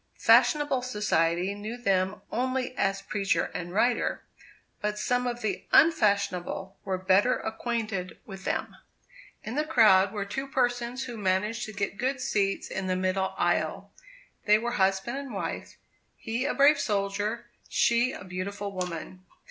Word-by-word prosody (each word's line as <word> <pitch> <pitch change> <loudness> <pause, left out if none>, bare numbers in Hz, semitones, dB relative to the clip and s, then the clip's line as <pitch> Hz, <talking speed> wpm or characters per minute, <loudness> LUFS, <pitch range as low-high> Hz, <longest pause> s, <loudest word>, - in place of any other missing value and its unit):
Fashionable 290 -4 +4
society 195 -6 0
knew 210 +4 -6
them 195 -3 0
only 255 +1 -1
as 195 0 0
preacher 200 -1 0
and 175 0 -5
writer; 235 +6 +1 0.6
but 210 0 -1
some 250 +3 0
of 240 0 -3
the 210 -4 -3
unfashionable 200 - +2
were 190 -1 -2
better 190 +6 +3
acquainted 220 -5 -3
with 195 -2 -9
them. - - -3 0.7
In 220 - -5
the 300 +3 +1
crowd 215 -10 +5
were 205 -2 -3
two 270 +7 -4
persons 245 -1 -1
who 240 -3 -7
managed 210 +4 0
to 215 - -7
get 200 0 -3
good 265 +2 0
seats 200 -7 0
in 190 0 -4
the 185 - +1
middle 185 +1 -1
aisle. - - 0 0.5
They 210 0 +6
were 235 +2 -3
husband 195 +4 0
and 275 -6 -7
wife; 195 - -5 0.4
he 230 +4 -3
a 295 - -1
brave 285 +1 +5
soldier, 205 +1 -2 0.2
she 235 +2 +3
a - - -8
beautiful 200 +2 -5
woman. 185 0 -5
210 Hz, 150 wpm, -28 LUFS, 190-245 Hz, 0.7 s, They